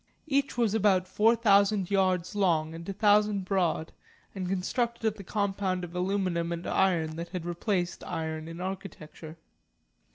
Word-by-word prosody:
Each 280 -4 0
was 230 -4 +2
about 195 -4 +3
four 215 +5 +3
thousand 200 -3 +3
yards 185 -2 +1
long 165 -6 +1
and 165 +3 -8
a - - -2
thousand 210 -1 +3
broad, 180 -4 0 0.4
and 185 -2 -4
constructed 235 +5 -1
of - - -8
the 200 - -10
compound 195 -2 -1
of 175 0 -7
aluminum 180 -2 -1
and 170 0 -4
iron 165 -5 +1
that 170 +1 -5
had 180 -2 -5
replaced 175 +1 -2
iron 160 0 -4
in 165 +1 -8
architecture. 180 -4 -7
185 Hz, 155 wpm, -28 LUFS, 170-205 Hz, 0.4 s, about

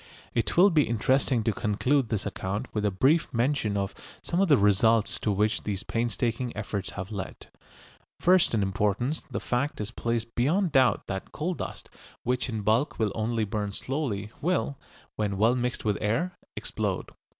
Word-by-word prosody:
It 105 -3 0
will 195 +3 +7
be 155 -3 +3
interesting 125 +1 +2
to 110 -1 +1
conclude 120 +6 +1
this 105 -4 -1
account 100 +7 -4
with 105 - -1
a - - +4
brief 135 - +2
mention 120 -4 +1
of 100 -1 -2 0.3
some 175 +2 0
of 195 - +4
the 145 -4 +6
results 105 +2 +3
to 105 - 0
which 105 +2 +1
these 100 -2 -3
painstaking 120 +1 -1
efforts 100 -1 -3
have 95 +1 -6
led. 100 -3 -6 0.7
First 180 -8 +4
in 105 - +2
importance 105 +9 0
the - - -3
fact 140 +4 -1
is 105 +1 -3
placed 115 -1 -2
beyond 165 +9 +2
doubt 130 -2 +3
that 95 -1 -5
coal 175 +4 -2
dust, - - -6 0.4
which 125 +1 0
in 110 -3 -2
bulk 110 +8 +1
will 110 -3 +1
only 110 0 0
burn 105 0 -3
slowly, 110 -6 -3
will, 170 -4 0 0.4
when 100 -2 -1
well 110 +4 +4
mixed 125 -1 -2
with 105 -1 +1
air, 125 +13 0 0.2
explode. - - -3
115 Hz, 170 wpm, -27 LUFS, 105-135 Hz, 0.7 s, will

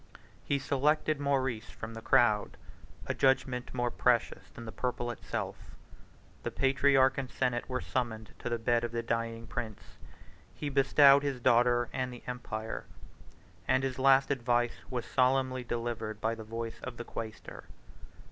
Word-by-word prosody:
He 140 - 0
selected 145 +2 +1
Maurice 130 -5 0
from 115 +1 -8
the 115 - -7
crowd, 120 -4 +3 0.5
a - - -1
judgment 130 -2 +1
more 120 -1 -1
precious 125 -1 +1
than 120 - -10
the 110 - -6
purple 120 -1 -2
itself: 120 - -6 0.7
the - - -3
patriarch 135 0 +3
and 130 -2 -4
senate 125 -1 -1
were 125 0 -2
summoned 110 -4 -3
to - - -4
the 120 - 0
bed 120 +1 +1
of 120 -1 -3
the 115 0 -1
dying 115 0 -2
prince: 110 -2 -7 0.6
he 145 - -3
bestowed 140 0 +6
his 140 -3 -2
daughter 120 0 +3
and 130 -1 -2
the 120 - -10
empire; 110 -3 -5 0.8
and 130 - +3
his 130 -1 -2
last 135 +1 +5
advice 120 -2 +1
was 125 -2 -3
solemnly 130 0 +1
delivered 115 -2 -3
by 110 +1 0
the 115 -1 -7
voice 115 +1 -5
of 125 -2 -7
the 120 - -6
quaestor. 110 -1 -7
125 Hz, 155 wpm, -31 LUFS, 115-135 Hz, 0.8 s, bestowed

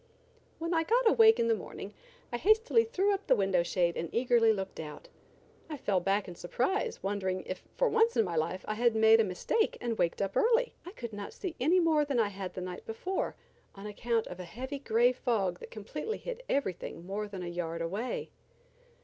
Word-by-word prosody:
When 335 +1 -2
I 325 -1 +2
got 475 +6 +3
awake 445 0 +6
in 230 - +2
the 230 - +4
morning 205 0 -7 0.4
I - - +1
hastily 445 - +4
threw 410 -3 +1
up 395 0 -4
the 260 - +5
window 195 -4 +2
shade 170 0 0
and 165 - -3
eagerly 235 -2 +4
looked 195 -3 -4
out. 150 -2 -8 0.6
I 305 - -4
fell 200 -7 +1
back 195 +3 0
in 180 - -7
surprise, 265 - -2
wondering, 190 -2 -1
if 185 - -5 0.2
for - - +3
once 455 +1 +3
in 225 - +4
my 175 -2 -3
life 165 +4 -1
I 215 - -1
had 235 +1 +2
made 220 0 +6
a - - +5
mistake 210 - 0
and 235 -2 -3
waked 170 - +1
up 195 -1 -2
early. 475 +2 +3
I - - -6
could 235 - -7
not 205 -1 -6
see 360 -5 -5
any 330 +8 +4
more 320 -3 +3
than 285 -3 -1
I 215 -3 +2
had 190 -2 -6
the 185 - -4
night 180 0 -6
before 355 +13 -3 0.4
on 195 +1 -10
account 225 +2 -1
of 180 - -8
a - - -5
heavy 260 - -6
gray 240 -1 +3
fog 215 -8 -1
that - - -10
completely 300 - -5
hid - - -6
everything 185 -9 -2
more 205 +3 -3
than 195 -3 -7
a - - -5
yard 170 -1 -3
away. 200 +9 -3
225 Hz, 210 wpm, -31 LUFS, -, 0.6 s, awake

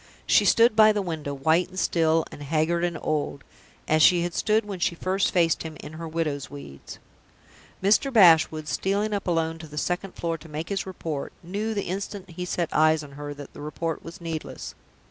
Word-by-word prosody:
She - - +4
stood 230 -1 +5
by 215 0 +7
the 205 - 0
window, 160 -5 -4
white 160 +6 +1
and 185 - -12
still, 165 -2 +2
and - - -10
haggard 160 +4 0
and 175 -2 -1
old 145 -2 -2 0.4
as 155 0 +3
she 175 +1 +6
had 175 0 -3
stood 215 0 +1
when 200 -3 -6
she 170 - 0
first 190 +3 0
faced 170 -3 +2
him 160 -2 -7
in 150 - -9
her 165 +1 -6
widow's 155 -4 -2
weeds. 140 - -10 0.9
Mr. 215 +8 +3
Bashwood, 160 - +5
stealing 200 +5 0
up 200 -1 -3
alone 165 -1 0
to 160 - -9
the 150 0 -11
second 180 +5 -2
floor 165 -1 -3
to 165 - -13
make 155 +2 -5
his 195 -1 -2
report, 160 -6 -5
knew, 210 +5 -3
the 200 - -1
instant 195 0 -5
he 180 +2 -5
set 175 -2 -2
eyes 155 0 +4
on 145 - -11
her, 145 +1 -7
that 145 -1 -10
the - - -10
report 160 +2 -4
was 170 +4 -10
needless. 165 -2 -6
165 Hz, 205 wpm, -25 LUFS, 155-190 Hz, 0.9 s, by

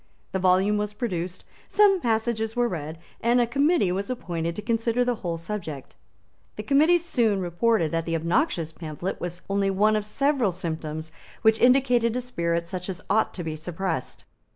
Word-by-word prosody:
The 190 - -1
volume 190 +3 +3
was 210 0 -3
produced; 185 -6 -4 0.2
some 400 -3 +4
passages 225 -1 0
were 245 0 +2
read; 160 -5 -5 0.2
and 240 +2 +3
a 240 - +4
Committee 280 - +2
was 195 +4 -2
appointed 170 -9 -3
to - - -4
consider 230 +2 +1
the 245 - +1
whole 170 -3 -2
subject. 165 -6 -6 0.6
The 210 - -5
Committee 300 +9 +4
soon 235 - +1
reported 175 -1 +1
that 165 0 -2
the 165 - 0
obnoxious 170 - 0
pamphlet 160 +3 -5
was 175 0 -5
only 195 0 +1
one 210 +3 +3
of 215 - 0
several 275 -2 +1
symptoms 160 -3 -5 0.3
which 220 0 +4
indicated 245 -2 +4
a - - -1
spirit 170 -8 -1
such 180 +1 -5
as 185 - -6
ought 220 +2 +3
to 175 - -4
be 160 -1 -4
suppressed. 165 -2 -4
200 Hz, 175 wpm, -25 LUFS, 170-235 Hz, 0.6 s, some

